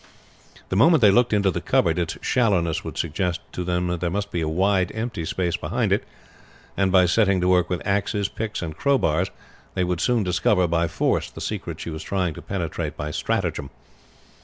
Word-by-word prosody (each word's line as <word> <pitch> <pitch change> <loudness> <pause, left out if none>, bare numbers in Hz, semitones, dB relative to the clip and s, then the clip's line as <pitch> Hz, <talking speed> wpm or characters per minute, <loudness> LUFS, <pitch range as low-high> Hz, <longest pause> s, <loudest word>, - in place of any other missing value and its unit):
The - - -1
moment 155 - +5
they 105 -3 +7
looked 120 +4 +3
into 100 -2 +3
the - - -3
cupboard, 85 +1 +2
its 85 -2 -2
shallowness 95 -10 +1
would - - -7
suggest 85 +2 -1
to 90 - -4
them 90 0 -1
that 90 -1 -2
there 90 - 0
must 100 +3 -3
be 85 - -1
a 80 - -1
wide 95 +2 +1
empty 110 -7 -3
space 90 0 -1
behind - - 0
it, - - +1 0.7
and 95 -1 +1
by 90 -1 +6
setting 95 +1 +3
to 90 - +1
work 90 -1 +3
with 90 -2 -3
axes, 100 0 0
picks, 110 -1 -4
and 80 -2 -5
crowbars, 95 - +1 0.5
they 95 - +1
would 90 -1 -1
soon 120 -3 +2
discover 90 0 +2
by 85 0 +1
force - - 0
the - - -11
secret - - -4
she 85 - -5
was 80 - -6
trying 90 -4 -1
to - - -9
penetrate 85 -5 -4
by 75 +1 -4
stratagem. 70 -1 -2
90 Hz, 200 wpm, -23 LUFS, 85-100 Hz, 0.7 s, they